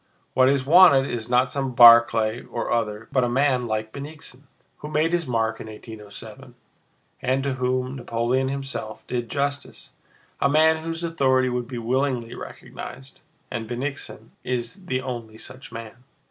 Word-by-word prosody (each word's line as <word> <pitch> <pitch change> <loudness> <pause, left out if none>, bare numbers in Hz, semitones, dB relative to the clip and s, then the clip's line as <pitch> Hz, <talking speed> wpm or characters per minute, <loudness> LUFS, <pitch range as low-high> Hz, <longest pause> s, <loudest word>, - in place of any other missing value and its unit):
What 130 0 +5
is 135 -1 +1
wanted 145 -4 +7
is 115 -1 -4
not 125 +1 +3
some 135 -3 -2
Barclay 115 -1 +7
or 120 - -4
other, 110 -1 -1
but 130 - +2
a 120 - +1
man 130 -1 +1
like 110 0 -3
Bennigsen, 140 -1 -9 0.3
who 150 - -8
made 155 +2 +1
his 170 -3 0
mark 115 -2 -1
in - - -8
1807, 110 -1 -11 0.7
and 130 +1 0
to 140 -1 -1
whom 130 +1 -1
Napoleon 120 +2 0
himself 135 -5 -5
did 120 -2 -3
justice—a 140 0 -4
man 160 +2 +4
whose 165 +1 -4
authority 130 -6 +2
would 125 -1 -3
be 125 - -6
willingly 125 0 -1
recognized, 65 -1 -10 0.3
and 110 -1 -4
Bennigsen 135 +4 -5
is 125 - -4
the 130 -4 -1
only 120 -4 -6
such 130 +3 -10
man." 115 +1 -9
125 Hz, 150 wpm, -24 LUFS, 115-140 Hz, 0.7 s, wanted